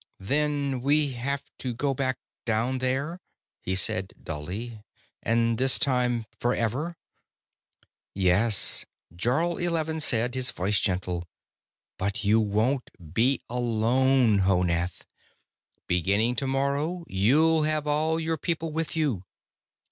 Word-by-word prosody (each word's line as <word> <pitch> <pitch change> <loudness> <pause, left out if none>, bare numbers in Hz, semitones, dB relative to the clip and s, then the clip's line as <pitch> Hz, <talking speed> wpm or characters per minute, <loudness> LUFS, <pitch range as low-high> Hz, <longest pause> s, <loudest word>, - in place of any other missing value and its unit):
"Then 140 +3 0
we 145 +2 +2
have 135 +3 -3 0.2
to 125 -2 -4
go 140 +3 0
back 130 0 0 0.3
down 120 +3 0
there," 135 +7 -1 0.4
he 95 - -1
said 95 0 +1
dully. 100 +9 -6 0.4
"And 115 0 +1
this 130 -1 +5
time 125 -3 +1
forever." 125 +8 -1 1.2
"Yes," 95 +3 +3 0.3
Jarl 145 - 0
Eleven 160 -2 0
said, 120 -4 +1
his 130 -1 0
voice 105 -2 0
gentle. 90 -2 -2 0.7
"But 100 +3 -2
you 105 +2 +4
wont 110 +5 0 0.2
be 125 +6 +2
alone, 120 0 +2
Honath. 90 -2 0 0.8
Beginning 100 +7 +1
tomorrow, 140 +6 -1
you'll 150 +12 +3
have 155 -1 0
all 155 +2 +1
your 160 0 -1
people 165 -1 -2
with 160 +1 -3
you." 140 - 0
125 Hz, 110 wpm, -26 LUFS, 105-145 Hz, 1.2 s, this